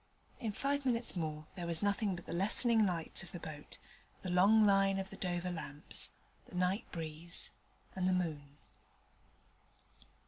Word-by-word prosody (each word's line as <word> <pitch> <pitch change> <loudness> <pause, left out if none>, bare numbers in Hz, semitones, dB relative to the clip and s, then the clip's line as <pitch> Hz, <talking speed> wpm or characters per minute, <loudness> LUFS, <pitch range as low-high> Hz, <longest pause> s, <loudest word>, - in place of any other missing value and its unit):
In 225 -4 -2
five 280 +6 -1
minutes 240 -4 +3
more 155 -3 -3
there 175 -2 -5
was 170 +2 +2
nothing 205 -1 +1
but 175 - -10
the - - -5
lessening 215 +4 +4
lights 170 -3 -2
of 190 - -10
the 175 - -6
boat, 155 -2 -8 0.5
the 185 - -3
long 205 +5 +6
line 195 -1 +4
of 190 0 -4
the - - -7
Dover 180 -1 -2
lamps, 150 -3 -3 0.4
the - - -11
night 185 +5 0
breeze, 165 +1 -3 0.4
and 185 -1 +1
the - - +3
moon. 150 -5 -2
180 Hz, 160 wpm, -35 LUFS, 165-200 Hz, 0.5 s, long